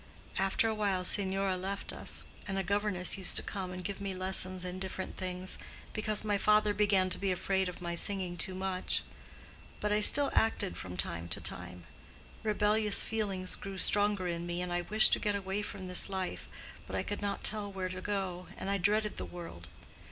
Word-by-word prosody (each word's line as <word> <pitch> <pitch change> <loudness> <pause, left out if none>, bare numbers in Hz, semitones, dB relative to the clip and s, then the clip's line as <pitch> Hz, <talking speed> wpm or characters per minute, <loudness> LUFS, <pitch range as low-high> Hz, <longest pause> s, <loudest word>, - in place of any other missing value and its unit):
After 195 +4 +2
a 220 - +1
while 200 -4 0
Signora 195 0 +1
left 195 +2 -3
us, - - +2 0.2
and 195 -1 -2
a 195 - 0
governess 200 -1 +1
used 190 - +1
to - - +1
come 190 -2 -4
and 180 0 -6
give 200 0 -5
me 195 -1 -3
lessons 185 0 0
in 180 +1 -4
different 190 0 -4
things, 185 0 0 0.3
because 215 -1 -1
my 205 -2 0
father 210 0 +4
began 195 -3 +2
to - - +2
be 195 -1 0
afraid 190 +1 0
of 180 - -9
my 170 0 -2
singing 185 0 +1
too 185 +1 0
much; 190 -1 0 0.8
but 210 - -1
I 210 0 +3
still 280 +6 +7
acted 220 -3 +2
from 90 -1 -7
time 85 0 -3
to - - +3
time. 90 0 -4 0.6
Rebellious 210 -1 +3
feelings 195 -4 -1
grew 195 -1 -7
stronger 205 0 +2
in 170 0 -3
me, 175 0 -2
and 180 -1 -3
I 175 - 0
wished 215 +5 +6
to - - +3
get 205 -1 0
away 195 +1 -2
from 195 -2 -6
this 180 +2 +1
life; 190 -1 -4 0.4
but - - -5
I - - 0
could 205 - -4
not 200 -1 -2
tell 210 -2 +3
where 190 -1 -3
to 185 0 -5
go, 190 -3 -3
and 195 - -3
I 200 - +1
dreaded 210 +3 +1
the - - -4
world. 165 - -9
190 Hz, 200 wpm, -32 LUFS, 185-205 Hz, 0.8 s, still